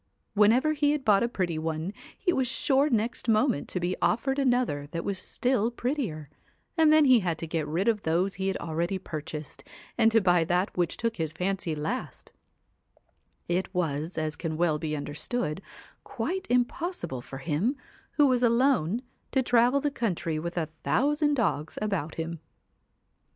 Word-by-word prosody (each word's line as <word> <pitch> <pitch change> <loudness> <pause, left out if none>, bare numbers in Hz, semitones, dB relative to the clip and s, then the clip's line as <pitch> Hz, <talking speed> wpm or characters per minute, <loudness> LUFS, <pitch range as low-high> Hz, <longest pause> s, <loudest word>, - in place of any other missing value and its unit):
Whenever 230 +9 +4
he 295 -1 +2
had 295 -3 -3
bought 200 -2 +5
a 235 - +2
pretty 180 -8 -2
one, 160 +3 -3 0.2
he 355 - +1
was 260 -5 +1
sure 275 +3 +2
next 235 0 -1
moment 220 - +2
to 180 - -2
be 180 +1 -1
offered 270 +4 +1
another 245 - +1
that 165 +3 -5
was 195 -2 -2
still 245 -3 0
prettier, 240 - -3 0.5
and 320 -2 +5
then 310 -1 +6
he 255 -3 +6
had 175 -5 -1
to 165 - -4
get 160 -2 -2
rid 170 +7 -1
of 220 -3 +2
those 180 +4 +1
he 190 0 -3
had 195 - 0
already 170 +3 -2
purchased, 155 -4 -7 0.4
and 225 -1 +5
to 225 - +5
buy 180 -4 +3
that 180 +4 0
which 175 -2 0
took 230 -1 -2
his 160 -3 -2
fancy 180 -2 -2
last; 150 +1 -4 1.2
it 180 +2 -1
was, 160 -1 -2
as 155 -1 -1
can 160 -2 -4
well 160 -3 +2
be 155 -1 -2
under 145 0 -5
stood, 190 0 -2 0.4
quite 285 +10 -3
impossible 245 - -1
for 135 - -9
him, 165 - 0 0.4
who 295 - +4
was 255 -3 +3
alone, 235 - +2 0.3
to 265 - +2
travel 245 +3 +4
the 290 0 0
country 175 - -2
with 170 +2 -5
a 165 - +1
thousand 290 - +1
dogs 170 - -1
about 195 -7 -2
him. 165 0 -4
195 Hz, 170 wpm, -28 LUFS, 160-250 Hz, 1.2 s, then